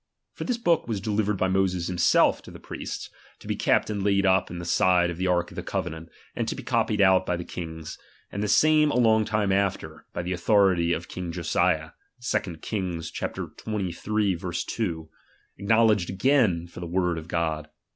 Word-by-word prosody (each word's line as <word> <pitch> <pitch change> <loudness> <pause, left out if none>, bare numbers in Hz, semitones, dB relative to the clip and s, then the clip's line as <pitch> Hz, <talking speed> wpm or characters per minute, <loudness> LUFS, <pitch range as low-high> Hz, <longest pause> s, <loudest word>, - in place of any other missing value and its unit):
For - - -6
this 250 -2 -1
book 170 - +1
was 110 -4 -2
delivered 105 0 0
by 95 - +1
Moses 95 -2 +1
himself 90 -1 +3
to - - -13
the - - -11
priests, - - -7 0.3
to - - -17
be - - -1
kept - - +2
and 100 -1 -2
laid 100 0 +2
up 95 -1 +3
in 90 - -6
the 85 - -6
side 90 -1 +3
of 85 - -7
the 95 +1 -1
ark 85 -1 +1
of - - -12
the - - -4
covenant, 80 -1 -4 0.3
and - - -2
to - - -2
be - - -8
copied - - +1
out 95 -1 +5
by 90 -1 -1
the 85 - -5
kings; 80 -2 -7 0.3
and 100 - -4
the 105 - 0
same 155 +6 +4
a - - -1
long 110 -3 +4
time 105 -2 0
after, 100 0 -1
by 85 - -4
the 90 +2 -2
authority 90 -3 +3
of 85 0 -2
king 90 -2 -5
Josiah 85 -1 0 0.3
(2 100 -7 -2
Kings 90 -6 -3
sxiii. 100 -3 -3
2), 85 -8 -3 0.5
acknow 110 +3 +4
ledged 105 -5 +2
again 95 -5 +2
for 85 0 -11
the 85 - -5
uiord 90 -1 0
of 80 - -11
God. 80 -3 -2
95 Hz, 195 wpm, -26 LUFS, 85-105 Hz, 0.5 s, out